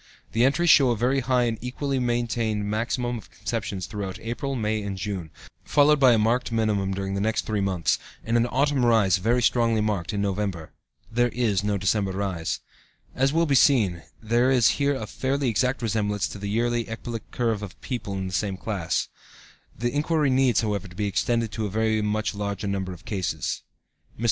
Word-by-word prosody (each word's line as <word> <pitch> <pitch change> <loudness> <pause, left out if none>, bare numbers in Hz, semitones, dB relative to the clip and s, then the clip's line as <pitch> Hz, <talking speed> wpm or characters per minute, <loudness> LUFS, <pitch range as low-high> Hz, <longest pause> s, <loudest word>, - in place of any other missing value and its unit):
The 115 - +2
entries 145 +6 +4
show 135 -4 +6
a 120 - +1
very 130 +5 +2
high 125 0 +2
and 115 -2 -1
equally 135 +2 -2
maintained 115 -3 0
maximum 120 +3 -1
of - - -16
conceptions 105 -5 -4
throughout 100 -1 -5
April, 125 +4 -3
May 110 -2 -1
and 100 -2 -4
June, 95 -4 -4 0.3
followed 150 0 +4
by 130 -3 +6
a - - +4
marked 115 +3 +1
minimum 105 -4 +1
during 95 0 -3
the 100 - -1
next 110 +2 0
three 105 -2 -1
months, 95 -4 +1 0.2
and 115 - -1
an 120 0 +3
autumn 135 +1 +1
rise 110 -6 +4
very 120 +6 +1
strongly 115 -2 +3
marked, 105 -5 -1
in 100 - -2
November. 100 -5 -2 0.4
There 120 +1 +2
is 110 -6 0
no 105 -1 0
December 100 0 0
rise. 95 -4 -2 0.5
As 135 +1 +2
will 165 +2 +2
be 145 - +1
seen, 110 - +4 0.2
there 120 +3 +2
is 125 -5 +5
here 140 0 +2
a - - -4
fairly 135 0 -1
exact 125 +3 0
resemblance 105 -2 0
to 100 - -8
the 100 0 -4
yearly 120 +2 0
ecbolic 115 0 -6
curve 115 -4 -1
of 100 -3 -8
people 120 -7 -4
of 95 - -3
the 95 - -5
same 95 0 -1
class. 95 -6 -2 0.7
The 120 +1 -1
inquiry 150 -1 +1
needs, 130 -3 +3
however, 105 -2 -2
to 90 - -14
be 105 +2 -1
extended 115 +3 0
to 110 -1 -2
a - - -5
very 110 +1 +1
much 105 +1 -1
larger 100 -1 -3
number 95 -2 -2
of 90 0 -11
cases. 95 -4 -2 0.6
Mr. - - -22
110 Hz, 195 wpm, -25 LUFS, 100-120 Hz, 0.7 s, show